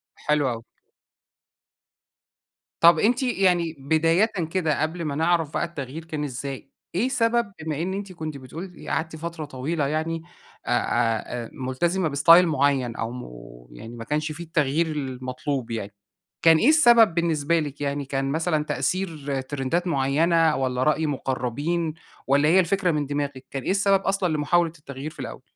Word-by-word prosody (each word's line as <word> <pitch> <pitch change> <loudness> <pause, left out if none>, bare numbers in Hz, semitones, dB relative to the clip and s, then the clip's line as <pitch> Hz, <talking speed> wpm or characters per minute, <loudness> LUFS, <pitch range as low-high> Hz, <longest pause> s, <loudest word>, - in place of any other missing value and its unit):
حلو 150 -3 +1
أوي. 115 -1 -5 2.2
طب 170 -1 +7
أنتِ 245 +4 +2
يعني 180 -9 +1
بدايةً 165 +7 +3 0.3
كده، 160 -5 0
قبل 160 +2 -2
ما 145 - -2
نعرف 165 -1 +1
بقى - - 0
التغيير 155 -1 -7
كان 155 -2 -4
إزاي. 135 0 -5 0.3
إيه 230 +8 +1
سبب، 235 -3 +1
بما 155 -1 -3
إن 185 +3 -2
أنتِ 195 -1 -5
كنتِ 155 -3 -6
بتقولي 165 +8 -9
قعدتِ 160 0 -2
فترة 160 0 -5
طويلة 145 +2 -2
يعني 160 +2 -2 0.4
أ - - -6
أ 120 0 0
أ - - -11
ملتزمة 165 +8 -1
باستايل 165 +5 +6
معين 135 -5 +1
أو 115 +1 -3
م 125 0 -7 0.5
يعني 115 - -9
ما 115 - -7
كانش 150 +5 -2
في 160 +3 -7
التغيير 160 0 +1
المطلوب 130 -3 -4
يعني، 105 -3 -4 0.5
كان 165 -1 +7
إيه 240 - +4
السبب 240 - +6
بالنسبة 170 -1 +1
لِك 145 -2 -5
يعني، 140 0 -2
كان 135 0 -2
مثلًا 160 0 0
تأثير 145 -3 -2
ترندات 145 +6 -2
معينة 160 +2 +2
والّا 130 -1 0
رأي 155 +2 +2
مقربين 145 +4 -2 0.3
والّا 140 +2 +4
هي 180 +3 +6
الفكرة 185 0 +2
من 150 -2 -1
دماغِك؟ 140 -2 -3
كان 135 -2 -4
إيه - - 0
السبب 195 0 +3
أصلًا 195 -4 0
لمحاولة 165 +3 +2
التغيير 140 0 -7
في - - -18
الأول؟ 130 0 -7
155 Hz, 155 wpm, -24 LUFS, 135-170 Hz, 2.2 s, طب